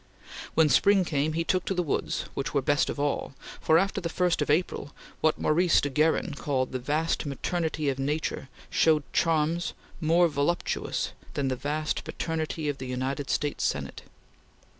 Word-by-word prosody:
When 160 -1 +5
spring 195 +5 +4
came, 150 0 0
he 165 +1 0
took 185 +1 +1
to 195 - -1
the 180 - +1
woods, 150 - -1
which 140 - -3
were 140 - +3
best 145 +1 +2
of - - -4
all, 145 -1 -1 0.3
for 160 - +4
after 195 +2 +1
the 170 - -2
first 175 -1 +1
of 150 - -1
April, 150 -2 0 0.2
what 155 - +2
Maurice 170 +2 +3
de 145 - -1
Guerin 155 +3 +2
called 135 -3 -1
"the 130 - -2
vast 150 +6 0
maternity" 155 +1 -2
of 135 -1 0
nature 145 -1 -2 0.2
showed 155 -2 +3
charms 165 +1 +1 0.3
more 170 +2 +4
voluptuous 150 +3 -1 0.2
than 135 -2 0
the 130 - 0
vast 150 +4 -2
paternity 160 -1 -3
of 145 -1 -2
the 130 - -5
United 130 +2 -3
States 145 -1 -1
Senate. - - -2
155 Hz, 170 wpm, -27 LUFS, 145-165 Hz, 0.3 s, When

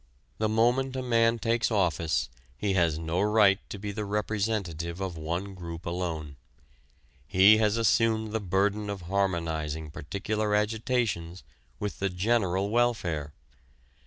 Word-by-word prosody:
The 110 0 +1
moment 120 +4 +2
a 130 - -2
man 115 -1 +3
takes 115 0 +1
office 85 -7 +1 0.3
he 100 -2 0
has 85 -4 +2
no 80 +2 -1
right 105 -1 +4
to - - -6
be 100 +1 -5
the 105 +1 -4
representative 100 -5 -2
of 95 -3 -3
one 85 +5 -4
group 85 -2 -8
alone. 80 -5 -4 0.9
He 100 +4 +6
has 110 0 +2
assumed 110 -1 +2
the 110 - -1
burden 100 +2 0
of 100 -2 -4
harmonizing 80 -5 -1
particular 105 +7 -2
agitations 105 - -1 0.3
with 105 +9 -4
the 100 - 0
general 95 0 0
welfare. 100 -11 0
100 Hz, 130 wpm, -28 LUFS, 85-110 Hz, 0.9 s, He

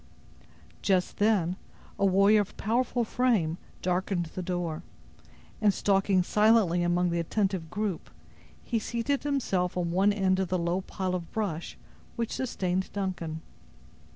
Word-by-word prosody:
Just 185 -2 +1
then, 195 -4 +2 0.4
a 200 - +3
warrior 200 +3 +5
of 200 - -7
powerful 240 +3 0
frame, 220 -9 +1 0.2
darkened 180 0 0
the 185 - -4
door, 175 -3 -3 0.8
and 210 -2 +5
stalking 195 -1 +2
silently 210 -3 +3
among 175 0 +1
the 170 - 0
attentive 190 -1 -1
group, 210 -1 -3 0.5
he 230 - -1
seated 235 +5 -1
himself 195 -12 -1
on 170 -1 -1
one 195 +4 +3
end 190 -2 +1
of 190 - 0
the 185 - 0
low 170 +2 0
pile 185 -1 -3
of 175 -2 -4
brush 185 -7 -3 0.4
which 230 -2 -2
sustained 190 -7 -2
Duncan. 175 -5 -3
190 Hz, 135 wpm, -28 LUFS, 175-210 Hz, 0.8 s, warrior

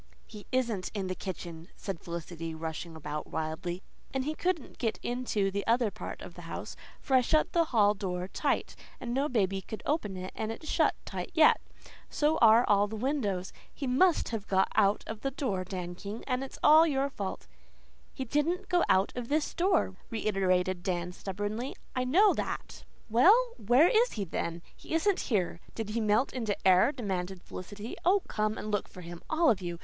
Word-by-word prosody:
"He 210 -2 -12
isn't 235 -7 0
in 200 -2 -1
the 185 - -2
kitchen," 170 -3 -7
said 195 -5 -5
Felicity 165 -1 -6
rushing 160 +1 -5
about 150 -1 -5
wildly, 165 +3 -4 0.3
"and 265 -1 -1
he 305 - -1
couldn't 345 -3 -2
get 225 -3 0
into 240 -5 0
the 200 +1 -2
other 230 -2 +3
part 215 - -7
of - - -9
the - - -11
house, - - -6 0.2
for 270 - -4
I 255 - +7
shut 310 +5 +2
the 335 -1 +4
hall 210 -7 +4
door 185 -3 -3
tight, - - -1 0.2
and 240 -1 -4
no 275 +4 +1
baby 195 -5 +1
could 215 +3 -8
open 215 - -1
it 185 0 -6
and 220 0 -3
it's 310 +7 -8
shut - - +2
tight - - -5
yet. 315 -2 +6 0.5
So 300 +1 +1
are 230 +1 +7
all 205 0 +4
the 220 - -6
windows. 215 -7 -1 0.2
He 280 - -5
MUST 310 +8 +3
have 220 -3 -4
gone 190 0 +3
out 200 +1 +3
of 220 -1 -6
that 270 -1 -3
door, 195 -10 -1
Dan 180 -1 -5
King, 200 +5 -7
and 255 0 -1
it's 270 - -8
your 300 -3 +6
fault." 190 - -5 0.7
"He 265 - -5
DIDN'T 330 - 0
go 355 -1 +3
out 190 +1 +3
of 245 -2 -4
this 300 +1 0
door," 345 - +1
reiterated 185 -4 +1
Dan 180 -2 -2
stubbornly. 205 +7 -4 0.2
"I 255 0 0
know 380 +11 +5
that." - - -5 0.2
"Well, 405 - +5
where 245 - +6
is 475 +3 +3
he, 210 - -2
then? 170 -1 -4
He - - -5
isn't 380 +4 +2
here. 185 -7 0 0.2
Did 225 -2 -4
he 230 +2 -1
melt 215 +5 +2
into 225 -5 -1
air?" 185 +8 +6
demanded 190 -7 -4
Felicity. 205 +5 -7
"Oh, 380 +2 +4
come 215 0 -1
and 215 - -4
look 205 - 0
for 180 - -12
him, 170 0 -9
all 320 -1 +4
of 200 -4 -1
you. 175 -1 -4
215 Hz, 190 wpm, -30 LUFS, 185-270 Hz, 0.7 s, I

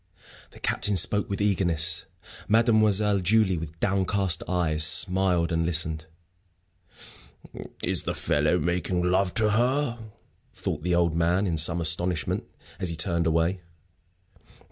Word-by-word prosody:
The - - -17
Captain 105 -1 -1
spoke 105 +4 +2
with 100 - -4
eagerness; 85 -4 +1 0.4
Mademoiselle 110 -3 +2
Julie, 95 -1 +1
with 80 0 -9
downcast 95 -1 0
eyes, 80 -4 +1
smiled 90 0 +3
and 85 0 0
listened. 80 -1 -3 1.8
"Is - - 0
the - - -4
fellow - - 0
making 90 +1 -2
love 90 +1 0
to 110 -1 +2
her?" 120 +3 0 0.6
thought 75 - -4
the 90 +2 -1
old 85 -2 +1
man, 85 +4 +1
in 85 -4 -1
some 80 +2 +3
astonishment, 85 0 0 0.3
as 90 - -1
he 85 - -3
turned 85 +1 0
away. 85 +3 0
90 Hz, 125 wpm, -25 LUFS, 85-100 Hz, 1.8 s, smiled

